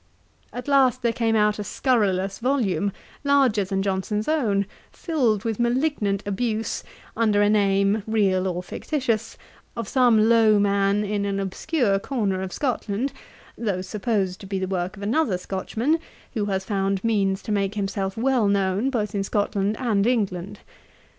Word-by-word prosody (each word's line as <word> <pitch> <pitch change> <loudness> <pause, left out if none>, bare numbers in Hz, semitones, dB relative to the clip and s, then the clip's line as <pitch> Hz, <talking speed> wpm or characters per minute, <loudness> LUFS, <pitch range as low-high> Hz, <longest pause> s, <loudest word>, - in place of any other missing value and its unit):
At 250 +2 -7
last 260 -3 +3
there 235 -1 +2
came 225 -1 +1
out 210 -1 +2
a - - -2
scurrilous 195 -5 0
volume, 230 -6 0 0.3
larger 270 -7 +3
than 195 0 -2
Johnson's 200 +2 -1
own, 220 -11 +1 0.3
filled 245 - 0
with 225 -1 -2
malignant 240 -5 0
abuse, 220 +2 -2 0.3
under 215 -2 +2
a 205 - +3
name, 200 0 +2
real 195 -4 +2
or 180 0 -3
fictitious, 230 - -2 0.4
of 230 -3 -3
some 235 -4 +4
low 225 -2 +5
man 200 0 +2
in 205 0 -1
an 200 0 -1
obscure 200 - 0
corner 200 -6 -1
of 190 -1 -4
Scotland, 250 -1 -2 0.4
though 195 -5 -2
supposed 200 -3 -1
to 195 - -10
be 195 0 -2
the 190 - -1
work 185 +1 -3
of 200 - -8
another 225 - +1
Scotchman, 225 - -1 0.3
who 215 -4 -1
has 190 -2 -2
found 195 -1 -1
means 200 -4 +1
to - - -4
make 200 0 0
himself 195 -1 -2
well 245 -2 +2
known 200 +4 +1
both 220 -6 -2
in 200 -1 0
Scotland 205 0 0
and 215 -4 +1
England. 200 -4 -1
210 Hz, 155 wpm, -24 LUFS, 195-235 Hz, 0.4 s, low